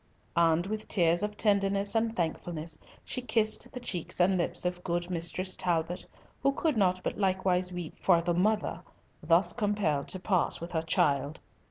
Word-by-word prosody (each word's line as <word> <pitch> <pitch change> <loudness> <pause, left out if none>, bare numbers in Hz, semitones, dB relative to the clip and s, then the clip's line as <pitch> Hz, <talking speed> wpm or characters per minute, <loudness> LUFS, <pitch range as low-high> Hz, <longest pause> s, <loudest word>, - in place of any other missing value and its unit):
And 170 0 +3
with 215 +2 -4
tears 170 -2 +2
of 210 0 -3
tenderness 200 -1 +2
and 225 0 0
thankfulness 160 -2 -3 0.3
she 255 - -3
kissed 230 0 +1
the 250 - -6
cheeks 180 -9 -3
and 185 +2 +4
lips 175 0 0
of 180 0 -2
good 175 +1 -2
Mistress 180 +2 -1
Talbot, 175 -1 -1 0.3
who 275 +1 +2
could 310 +1 0
not 185 -3 +2
but - - -3
likewise 185 -2 +1
weep 175 -3 -7
for 175 -3 +4
the 170 +1 0
mother 210 +5 0 0.4
thus 165 +4 +4
compelled 205 -10 0
to 185 - -4
part 185 -1 0
with 170 +1 -7
her 160 - 0
child. 145 -2 0
180 Hz, 170 wpm, -29 LUFS, 170-205 Hz, 0.4 s, and